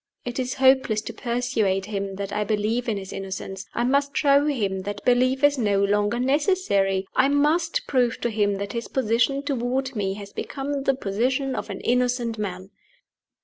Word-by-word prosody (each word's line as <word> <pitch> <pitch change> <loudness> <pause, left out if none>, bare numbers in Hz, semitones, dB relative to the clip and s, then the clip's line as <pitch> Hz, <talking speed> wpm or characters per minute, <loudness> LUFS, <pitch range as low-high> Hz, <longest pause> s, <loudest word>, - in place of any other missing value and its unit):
It 245 +1 -4
is 255 0 -2
hopeless 260 -4 +4
to - - -7
persuade 235 -6 -1
him 200 -2 -4
that 200 0 -5
I 210 - 0
believe 220 +3 -1
in 215 - 0
his 190 -1 -7
innocence: 195 0 -6
I 235 - +1
must 280 +3 +1
show 285 0 +4
him 205 -10 -1
that 205 +2 -6
belief 255 +2 +3
is 290 -1 +4
no 200 -3 +2
longer 205 +3 +1
necessary; 255 - +1
I 260 - +4
must 305 +4 +1
prove 250 -4 +1
to 235 - 0
him 205 -2 +1
that 200 +1 -5
his 235 0 -4
position 260 +3 +1
toward 260 -1 -2
me 195 -2 -1
has 200 -1 -10
become 275 0 -4
the 270 - +3
position 255 +5 -1
of - - -5
an - - -6
innocent 245 -2 0
man!" 190 -1 -5
240 Hz, 180 wpm, -24 LUFS, 200-265 Hz, -, hopeless